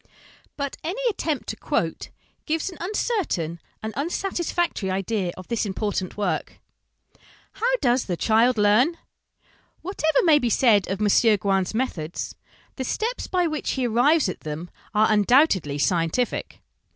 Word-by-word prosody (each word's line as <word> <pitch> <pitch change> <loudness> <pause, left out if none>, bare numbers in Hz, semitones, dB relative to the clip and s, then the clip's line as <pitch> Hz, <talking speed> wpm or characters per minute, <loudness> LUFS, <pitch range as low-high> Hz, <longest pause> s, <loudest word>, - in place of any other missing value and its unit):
But 280 -1 -3
any 365 +9 -3
attempt 320 -8 -3
to - - -3
quote - - -2 0.4
gives 320 +3 -1
an 355 - -12
uncertain 350 - -1 0.2
and 220 0 -4
unsatisfactory 345 - -1
idea 190 0 -1
of 185 - -10
this 235 - -1
important 200 -2 -3
work. 205 - -2 0.9
How 475 - -1
does 245 0 +2
the 175 -3 -2
Child 230 +4 +3
learn? 215 +11 +4 0.9
Whatever 315 -4 +1
may 315 -4 +6
be 245 - 0
said 215 -4 +4
of 195 +1 -2
M. 210 +1 +4
Gouin's 195 0 0
methods, 175 -10 -3 0.4
the 260 - -2
steps 450 - -2
by 360 -1 +1
which 310 -2 -2
he 260 -2 -1
arrives 250 +5 +3
at 185 - -4
them 155 +3 -6 0.2
are 215 +1 +4
undoubtedly 210 - +3
scientific. 170 - -1
230 Hz, 140 wpm, -24 LUFS, 195-315 Hz, 0.9 s, may